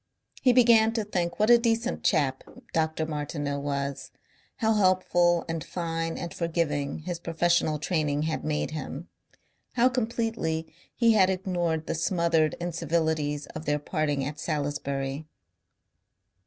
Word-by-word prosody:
He 255 - +5
began 230 -2 +5
to 225 -2 0
think 175 -4 -2
what 215 +3 +4
a 240 - +8
decent 230 +1 0
chap 140 -7 +1 0.3
Dr. 160 0 0
Martineau 145 -2 -3
was, 140 -1 -3 0.5
how 220 -1 +1
helpful 180 -3 +3
and 165 -1 -3
fine 165 -1 -3
and 170 - -5
forgiving 155 -4 -1
his 175 0 -4
professional 170 -2 +1
training 150 -2 0
had 160 0 -2
made 150 0 -1
him, 155 +2 -6 0.6
how 250 +1 +4
completely 225 -10 -2 0.2
he 230 -2 +4
had 190 -3 +5
ignored 175 -4 -1
the - - -2
smothered 165 -2 +1
incivilities 160 -3 -1
of 155 +1 -7
their 150 0 +1
parting 145 -2 -1
at 150 +2 -5
Salisbury. 140 -1 -3
165 Hz, 130 wpm, -27 LUFS, 150-185 Hz, 0.6 s, a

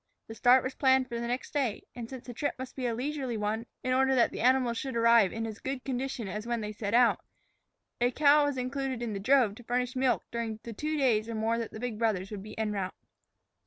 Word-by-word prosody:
The 225 - -7
start 245 +3 +5
was 260 - -3
planned 265 -1 +3
for 235 -1 -4
the 235 - -3
next 250 +2 -3
day, 265 -8 -1
and 235 -2 -7
since 260 -2 -8
the 245 - -7
trip 285 +4 -2
must 260 0 -7
be 255 -2 -2
a 230 - -1
leisurely 265 -2 -3
one 215 +2 -2 0.2
in 255 - +1
order 265 +1 +3
that 240 -2 +4
the - - -6
animals 250 -1 +3
should 265 -3 -4
arrive 230 -4 +5
in 225 0 -3
as 220 -1 -6
good 265 -1 -4
condition 260 -3 -3
as 210 +4 -5
when 235 -1 -1
they 210 0 -4
set 210 0 -2
out, 240 -1 +4 0.8
a 245 +1 +3
cow 290 +3 +5
was 285 -2 -1
included 255 -1 -2
in 225 -3 -3
the 200 - -3
drove 240 0 +4
to 240 - -13
furnish 250 +2 -1
milk 260 -1 +1
during 230 -2 -3
the 230 - -7
two 305 +7 -2
days 230 -5 +2
or 230 - -3
more 225 +2 0
that 230 - -3
the 220 - -9
big 230 -2 -4
brothers 205 -4 0
would 205 -2 -5
be 215 +2 -10
en 220 -1 -1
route. 190 -2 -3
240 Hz, 250 wpm, -29 LUFS, 220-260 Hz, 0.8 s, start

